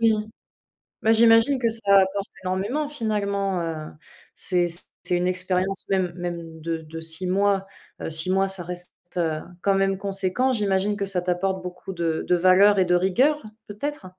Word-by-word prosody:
Oui, 225 -1 +5 0.9
bah, 220 - +3
j'imagine 230 +4 +5
que 235 - +2
ça 205 -3 +4
apporte 195 +1 0
énormément, 200 +11 -1
finalement, 200 -7 -1
heu, 160 -2 -5 0.4
c'est 180 -2 +1 0.4
c'est 180 0 +1
une 180 +1 0
expérience 185 +1 -1
même 185 -3 0
même 170 -2 -6
de 165 +1 -2
de 160 0 -9
6 160 +3 -1
mois, 195 +1 +2 0.4
heu, - - -3
6 160 +3 0
mois, 195 +1 +2
ça 190 -2 0
reste, 180 +1 -6 0.2
heu, 160 -3 0 0.2
quand 200 - +2
même 195 0 +1
conséquent. 195 +5 0
J'imagine 205 -3 0
que 200 -1 -2
ça 190 -2 +1
t'apporte 185 +1 -1
beaucoup 180 +1 -7
de 165 -2 -1
de 180 - +4
valeurs 185 +3 +5
et 185 - +4
de 180 0 +3
rigueur, 245 +12 +2 0.2
peut-être? 210 +1 -5
190 Hz, 170 wpm, -24 LUFS, 180-205 Hz, 0.9 s, Oui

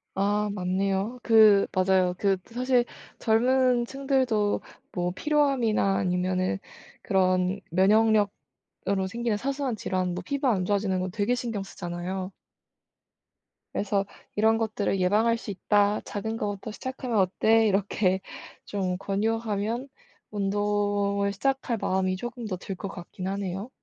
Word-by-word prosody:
아. 205 +2 +1
맞네요. 195 +4 -1
그 215 -3 +6
맞아요. 185 -1 +3
그 195 -1 +2
사실 250 +1 +1 0.3
젊은 245 +2 +3
층들도 260 -6 0 0.3
뭐 180 -1 -1
피로함이나 265 -10 +2
아니면은 185 +1 0 0.5
그런 185 0 +2
면역력으로 200 0 +1
생기는 230 +1 -1
사소한 270 0 -2
질환 185 -3 -1
뭐 180 - -5
피부가 275 -1 +1
안 185 -3 -1
좋아지는 200 -1 0
거 185 +1 -2
되게 205 +5 0
신경 230 -5 -3
쓰잖아요. 185 +1 -5 1.4
그래서 200 -1 0 0.3
"이런 220 +1 +4
것들을 215 -3 -1
예방할 215 +5 +3
수 225 - -6
있다. 205 +2 +2
작은 220 +2 -4
것부터 205 0 -4
시작하면 255 -1 -3
어때?" 220 +4 +3
이렇게 195 -1 +1 0.5
좀 185 -3 -2
권유하면 220 +4 -1 0.4
운동을 205 0 0
시작할 265 +2 -1
마음이 185 -2 0
조금 240 +4 -6
더 185 -3 -3
들 190 +2 -6
것 195 +2 -6
같긴 180 0 -7
하네요. 195 +2 -3
205 Hz, 280 characters per minute, -27 LUFS, 190-225 Hz, 1.4 s, 그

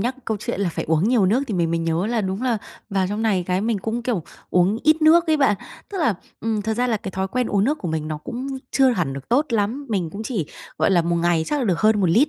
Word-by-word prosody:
nhắc 245 +5 -1
câu 220 - -1
chuyện 235 -2 -3
là 190 - +1
phải - - -3
uống 160 +6 +2
nhiều 235 -6 +3
nước 235 +8 +2
thì 220 - -3
mình 170 -2 +1
mới 170 - +1
nhớ 165 +3 0
là 230 -1 0
đúng 190 +4 -3
là 240 -4 +1 0.3
vào 195 -2 +1
trong 210 +2 -2
này 195 -5 +1
cái 185 +1 +1
mình 220 -1 0
cũng, 225 +4 -3
kiểu, 230 -9 -1 0.3
uống 185 +4 +3
ít 310 +1 +4
nước 335 +3 +6
ấy 315 -1 +3
bạn. 245 -8 +3 0.3
Tức 390 - -4
là, 300 - +2 0.3
ừm, 220 -2 -1
thật 220 +1 -1
ra 245 +2 +1
là 225 -3 +1
cái 195 - -6
thói 190 +1 -2
quen 250 +3 0
uống 200 0 +1
nước 295 +6 +1
của 180 - -4
mình 155 -1 -2
nó 155 - -3
cũng 245 - -6 0.2
chưa 265 -1 +4
hẳn 175 - -1
được 135 -1 -8
tốt 280 +6 +3
lắm. 230 +5 -1
Mình 185 -7 -1
cũng 210 +2 -6
chỉ, 210 - -2 0.3
gọi - - +3
là, 175 -3 +4
một 170 +1 0
ngày 170 -1 +2
chắc 295 - 0
là 260 - 0
được 185 -6 +1
hơn 215 -1 +4
1 185 - +3
lít, 255 - +4
210 Hz, 295 wpm, -22 LUFS, 180-245 Hz, 0.3 s, nước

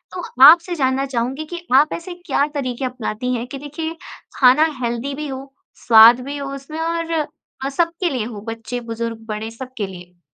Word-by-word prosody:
तो 360 - -5 0.2
आपसे 340 +4 +7
जानना 265 -2 +1
चाहूँगी 265 +4 -2
कि 345 - -5
आप 295 +3 +5
ऐसे 355 +1 -6
क्या 285 - +2
तरीके 255 -2 -3
अपनाती 250 -1 -3
हैं 235 0 -3
कि 275 - -7
देखिए, 295 +3 -5 0.4
खाना 265 +4 +6 0.2
हेल्दी 240 +4 -2
भी 300 +1 -5
हो, 270 0 -8 0.3
स्वाद 230 +2 +8
भी 285 +1 -5
हो 280 -1 -5
उसमें 275 +4 -8
और 330 0 -2 0.5
अ, - - 0
सबके 335 +4 0
लिए 255 -5 -2
हो, 220 -3 -7
बच्चे, 230 +2 -5
बुज़ुर्ग, 230 -1 -5
बड़े, 215 +1 -4
सबके 240 -3 -6
लिए? 180 -1 -13
265 Hz, 180 wpm, -20 LUFS, 235-300 Hz, 0.5 s, स्वाद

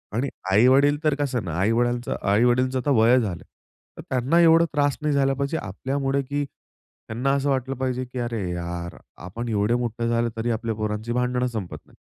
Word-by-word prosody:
आणि 135 +4 0 0.2
आई-वडील 135 +8 +5
तर 155 -2 +2
कसं 135 -5 -2
ना 85 - -4
आई-वडालच 120 +4 +1
आई-वडीलांचं 125 +5 +2
आता 135 +3 -1
वय 120 +3 +5
झालं, 95 -8 -3 0.5
तर - - -7
त्यांना 130 +6 +2
एवढा 165 0 +6
त्रास 145 -2 +1
नाही 150 -1 0
झाला 135 -1 +2
पाहिजे 140 +4 -2
आपल्यामुळे 135 +5 -2
की 145 +2 -2 0.7
त्यांना 125 +5 0
असं 140 0 0
वाटलं 135 0 -1
पाहिजे 130 0 -2
की 125 +1 -7
"अरे 120 -2 -2
यार! 85 0 -5 0.2
आपण 115 +7 -6
एवढे 105 +2 +1
मोठे 120 -1 -2
झाले 115 0 +1
तरी 115 +1 -1
आपल्या 115 0 -2
पोरांची 110 +1 -3
भांडणं 125 0 0
संपत 110 -7 -5
नाहीत." - - -23
125 Hz, 180 wpm, -24 LUFS, 110-135 Hz, 0.7 s, एवढा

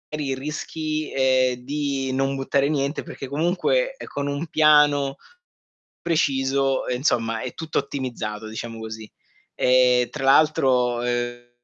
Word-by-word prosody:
magari 140 -3 -2
rischi, 155 +2 -4
ehm, 130 -1 +2
di 140 -1 -2
non 135 +1 0
buttare 135 +1 +1
niente 140 0 -1
perché 135 - -8
comunque, 195 - 0
ehm, - - -10
con 140 0 -4
un 145 +3 -2
piano 150 -3 +4 0.9
preciso, 135 -4 +1
ehm, 125 - -1
insomma 115 -4 0
è 125 - -5
tutto 160 -1 -2
ottimizzato, 120 -6 -5
diciamo 115 +1 -6
così. 110 -1 -8 0.4
E 125 -1 +4
tra 135 - -4
l'altro, 130 -4 +3
ehm, 120 0 -3
135 Hz, 130 wpm, -23 LUFS, 125-150 Hz, 0.9 s, piano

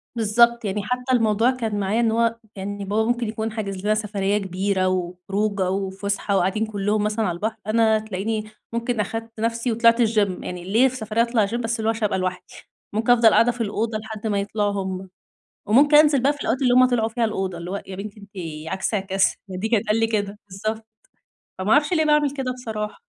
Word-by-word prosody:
بالضبط، 235 +1 +3
يعني 205 +1 -2
حتى 250 +4 -2
الموضوع 225 0 +3
كان 225 -5 -3
معايا 200 +3 0
إن 230 -2 +2
هُو 230 0 +2 0.2
يعني 200 +1 -5
بابا 210 +3 +1
ممكن 240 -1 0
يكون 220 +1 -3
حاجز 200 -3 -5
لنا 215 +1 +3
سفرية 205 -2 -1
كبيرة 190 -1 -1
و 185 -1 0 0.2
وخروجة 200 -1 0
وفسحة 195 +1 -2
وقاعدين 195 +4 +1
كلهم 210 0 -1
مثلًا 215 +1 0
على 175 - -2
البحر، 215 +5 -2
أنا 220 0 +3
تلاقيني 215 +1 -3 0.3
ممكن 235 0 -1
أخدت 225 +2 -4
نفسي 230 +2 -1
وطلعت 230 +1 +4
الgym، 210 -5 +1
يعني 180 -1 -6
ليه 225 +8 +4
في 260 - -4
سفرية 220 -1 -1
أطلع 235 -2 +2
gym؟! 210 +4 -4
بس 230 -1 -2
اللي 220 - -1
هُو - - +4
عشان 225 0 -5
أبقى 195 - 0
لوحدي، 185 0 -4 0.4
ممكن 225 +3 +2
أفضل 235 -2 +6
قاعدة 230 +2 +4
في 240 0 -7
الأوضة 220 +1 -1
لحد 220 0 -6
ما 205 -2 0
يطلعوا 205 +1 -1
هُم، 190 0 -5 0.6
وممكن 285 +8 +5
أنزل 295 -3 +5
بقى 285 - +4
في 290 - -11
الوقت 265 - 0
اللي 250 -2 +3
هُم 255 0 +7
طلعوا 225 -3 +1
فيه 235 +1 -2
الأوضة 190 -4 -3
اللي 170 +2 -6
هُو 200 - -3
"يا 190 - -6
بنتي 205 +2 -8
أنتِ 200 - -14 0.4
عكس 190 - -2
عكاس؟" 195 -1 +1
دي 190 +4 -3
كان 225 -3 +3
تتقال 220 0 0
لي 225 - +2
كده. 205 -2 -2
بالضبط، 215 +3 -4 0.7
فما 190 +3 0
أعرفش 295 +3 +4
ليه 315 -3 +3
باعمل 300 -1 +3
كده 265 -3 -3
بصراحة. 220 -4 -5
215 Hz, 210 wpm, -23 LUFS, 200-230 Hz, 0.7 s, هُم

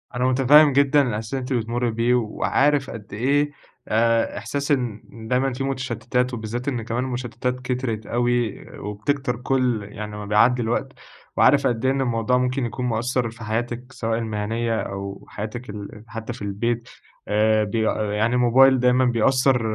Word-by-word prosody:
أنا 125 +1 0
متفهّم 135 +3 +6
جدًا 140 +1 +4
الإحساس 110 +1 -4
اللي 135 - -1
أنتِ 130 +1 -3
بتمرّي 120 +1 -1
بيه، 115 +2 +1
وعارف 135 +4 +1
قد 105 -3 -9
إيه 140 +7 +1 0.4
آآ 115 0 +2
إحساس 140 +7 -3
إن 120 -6 0 0.3
دايمًا 130 +2 +1
فيه 135 +2 -3
متشتتات 125 -1 -1
وبالذات 120 +3 -4
إن 125 -4 -1
كمان 115 +3 -2
المشتتات 125 0 -3
كترِت 125 -4 -3
أوي، 120 -2 0
وبتكتر 125 +6 -2
كُل 125 -3 0
يعني 105 +1 -7
ما 105 - -6
بيعدّي 115 +4 +3
الوقت، 115 +1 -1 0.5
وعارف - - +5
قد 120 +1 -1
إيه 130 - +4
إن 135 0 0
الموضوع 120 0 +1
ممكن 125 +1 0
يكون 125 +2 -4
مأثّر 120 +1 0
في 115 0 -11
حياتِك 120 +3 -3
سواء 115 -2 -2
المهنية 110 +1 -2
أو 100 0 -6
حياتِك 110 +4 -6
ال 105 +1 -8
حتّى 115 +1 -6
في 120 - -12
البيت، 115 +4 -2 0.4
آآ 110 +1 +3
ب 105 +1 -4 0.4
يعني 110 +4 +1
الموبايل 130 +2 +5
دايمًا 125 +1 +3
بيأثّر 125 +2 +3
120 Hz, 160 wpm, -23 LUFS, 110-130 Hz, 0.5 s, متفهّم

